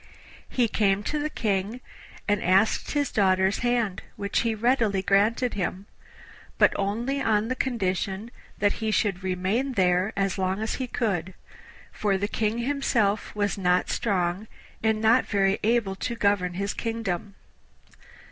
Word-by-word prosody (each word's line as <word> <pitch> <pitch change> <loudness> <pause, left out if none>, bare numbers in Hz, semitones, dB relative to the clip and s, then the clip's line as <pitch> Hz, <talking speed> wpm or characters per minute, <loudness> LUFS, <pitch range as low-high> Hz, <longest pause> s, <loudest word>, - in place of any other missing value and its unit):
He 245 -2 +2
came 200 -2 +1
to 300 +7 -2
the 300 +1 -1
King 210 -2 -1 0.5
and 205 -1 +1
asked 190 +4 +2
his 290 -1 0
daughter's 190 -1 +2
hand, 235 -6 0
which 200 0 -1
he 230 -1 0
readily 220 -4 +1
granted 215 +6 +2
him, 190 0 -3 0.7
but - - +5
only 235 +8 -1
on 215 -1 +1
the 255 - 0
condition 200 -3 -2 0.3
that 205 0 +2
he 220 - 0
should 200 -3 0
remain 190 +9 -1
there 185 -1 +2
as 195 0 0
long 190 +1 0
as 220 0 -2
he 255 - -2
could, 190 -7 -2 0.6
for 200 -2 0
the 200 +1 -1
King 215 +1 -1
himself 235 -9 0
was 205 -1 -1
not 180 -1 +2
strong 190 -1 -1 0.3
and 220 -1 +1
not 225 +3 +4
very 195 -1 +2
able 225 -3 +1
to 235 - -3
govern 200 -5 +1
his 200 +2 -2
kingdom. 205 -4 -3
205 Hz, 145 wpm, -26 LUFS, 190-230 Hz, 0.7 s, but